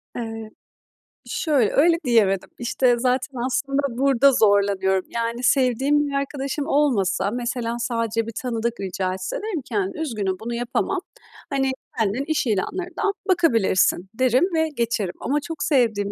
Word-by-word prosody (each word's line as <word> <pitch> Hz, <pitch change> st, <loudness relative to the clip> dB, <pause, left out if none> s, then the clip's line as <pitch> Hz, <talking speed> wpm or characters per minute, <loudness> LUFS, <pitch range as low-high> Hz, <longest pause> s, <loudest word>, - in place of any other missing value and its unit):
Evet. 225 Hz, -2 st, -6 dB, 0.7 s
Şöyle, 280 Hz, -, +1 dB
öyle 330 Hz, +4 st, +5 dB
diyemedim. 205 Hz, -6 st, +2 dB
İşte, 245 Hz, +1 st, +2 dB
zaten 255 Hz, +1 st, 0 dB
aslında 275 Hz, +2 st, 0 dB, 0.2 s
burada 275 Hz, 0 st, +4 dB
zorlanıyorum. 200 Hz, -4 st, +2 dB
Yani, 235 Hz, +1 st, -3 dB
sevdiğim 270 Hz, +3 st, +2 dB
bir 280 Hz, -, -5 dB
arkadaşım 275 Hz, +1 st, -2 dB
olmasa, 235 Hz, -, +1 dB
mesela, 240 Hz, 0 st, -2 dB
sadece 230 Hz, -2 st, -1 dB
bir -, -, -4 dB
tanıdık 235 Hz, -1 st, -2 dB
rica 185 Hz, -1 st, -2 dB
etse, 185 Hz, 0 st, -5 dB
derim 410 Hz, -7 st, -3 dB
ki, 240 Hz, -3 st, -8 dB
hani, 195 Hz, +3 st, -1 dB
"Üzgünüm, 215 Hz, -11 st, -2 dB
bunu 235 Hz, +2 st, -5 dB
yapamam. 240 Hz, +1 st, -1 dB, 0.5 s
Hani, 270 Hz, -1 st, 0 dB, 0.3 s
kendin 220 Hz, +4 st, 0 dB
iş 315 Hz, -3 st, 0 dB
ilanlarından 360 Hz, -, -1 dB, 0.2 s
bakabilirsin." 225 Hz, -, +2 dB
derim 255 Hz, +3 st, +2 dB
ve 320 Hz, -1 st, +1 dB
geçerim 235 Hz, -8 st, -1 dB
ama 290 Hz, +2 st, 0 dB
çok 325 Hz, +2 st, -5 dB
sevdiğim 225 Hz, -9 st, +2 dB
240 Hz, 140 wpm, -23 LUFS, 215-275 Hz, 0.7 s, öyle